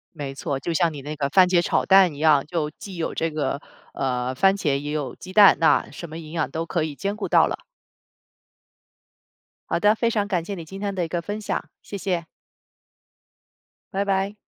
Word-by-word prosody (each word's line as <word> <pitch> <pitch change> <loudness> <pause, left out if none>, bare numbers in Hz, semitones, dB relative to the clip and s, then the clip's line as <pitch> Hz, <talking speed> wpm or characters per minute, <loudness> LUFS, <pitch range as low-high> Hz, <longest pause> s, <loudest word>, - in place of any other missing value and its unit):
没 140 -3 -5
错， 135 0 -3
就 170 +5 -3
像 165 0 +2
你 145 - -7
那 150 +3 -6
个 140 -1 -1
番 185 +3 +6
茄 180 -1 +3
炒 - - 0
蛋 190 -4 +6
一 - - -11
样， 150 -2 +4
就 155 -2 -2
既 190 +4 -10
有 165 - -3
这 165 - -1
个， 150 -2 -2 0.3
呃， 125 -1 -1
番 195 +8 +4
茄 150 -8 0
也 145 +1 -5
有 145 -5 -3
鸡 185 - -10
蛋， 205 0 +8
那 165 - +3
什 170 - -8
么 160 +1 -8
营 155 -2 -10
养 165 -4 -1
都 165 +3 -3
可 170 -2 -1
以 155 -2 -5
兼 200 +7 -3
顾 215 - -4
到 - - +5
了。 - - -5 2.1
好 - - 0
的 210 +1 +5
非 230 +1 0
常 210 -3 0
感 180 -5 0
谢 200 - -5
你 170 -4 -7
今 195 +5 -9
天 200 -1 -2
的 180 -2 -1
一 - - -5
个 175 +1 -2
分 205 +5 -5
享， 210 - -3 0.2
谢 205 - -7
谢。 180 -4 -2 1.7
拜 195 +1 0
拜。 195 +1 0
170 Hz, 230 characters per minute, -23 LUFS, 150-195 Hz, 2.1 s, 蛋